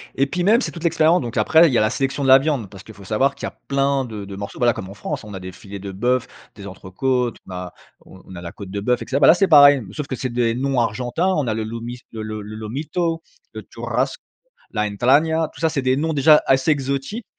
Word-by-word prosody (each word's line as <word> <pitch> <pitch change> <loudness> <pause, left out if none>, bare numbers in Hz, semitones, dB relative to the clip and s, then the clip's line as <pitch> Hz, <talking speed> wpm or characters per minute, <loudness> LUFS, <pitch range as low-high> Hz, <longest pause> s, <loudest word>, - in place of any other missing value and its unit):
et 135 - +2
puis 180 +5 -2
même 220 +6 +4
c'est - - -3
toute 170 - -10
l'expérience, 165 +1 +3
donc 120 -2 -5
après 160 +2 +5
il - - -3
y - - +3
a - - +3
la 110 - +2
sélection 135 +1 -2
de - - 0
la 130 0 +9
viande 135 -8 -2
parce 100 -1 -12
qu'il 110 - -13
faut 100 - -14
savoir 130 +8 0
qu'il - - -6
y - - -3
a - - -20 0.2
plein 140 0 +1
de 105 -4 -7
de 100 0 -8
morceaux, 100 +1 -7
voilà, 120 -1 +3
comme 95 -2 -7
en - - -9
France. - - -5
On 105 -1 -10
a - - -6
des 95 0 -8
filets 100 +1 -10
de 100 0 -7
bœuf, 125 +6 0 0.3
des 100 - -11
entrecôtes, 120 +6 -2
on - - -10
a 90 -1 -7 0.3
on 95 - -16
on 95 - -11
a 85 - -8
la 85 -1 -7
côte 100 -2 -10
de 100 - -3
bœuf, 125 +4 0
et - - -11
cetera. 135 +3 -1
Bah - - +6
là, - - +9
c'est 195 +1 +2
pareil, 145 -4 +7
sauf 150 -2 -5
que 130 - -3
c'est 130 - -4
des 120 -1 +1
noms 135 0 0
argentins. 120 - -1
On 155 -7 +1
a 110 - 0
le 110 - -3
lomis 115 +2 -6
le 110 -1 -6
le 110 0 -5
le 105 +1 -9
Lomito, 150 +10 -3 0.3
le - - -7
Churrasse, - - -2 0.6
la 105 - -1
Entragna. 145 +10 +2
Tout - - -13
ça, 160 - +2
c'est 145 -3 -2
des 130 0 +2
noms 160 +3 -1
déjà 150 +1 +5
assez 135 +3 +3
exotiques 140 - -2
125 Hz, 275 wpm, -21 LUFS, 105-145 Hz, 0.6 s, la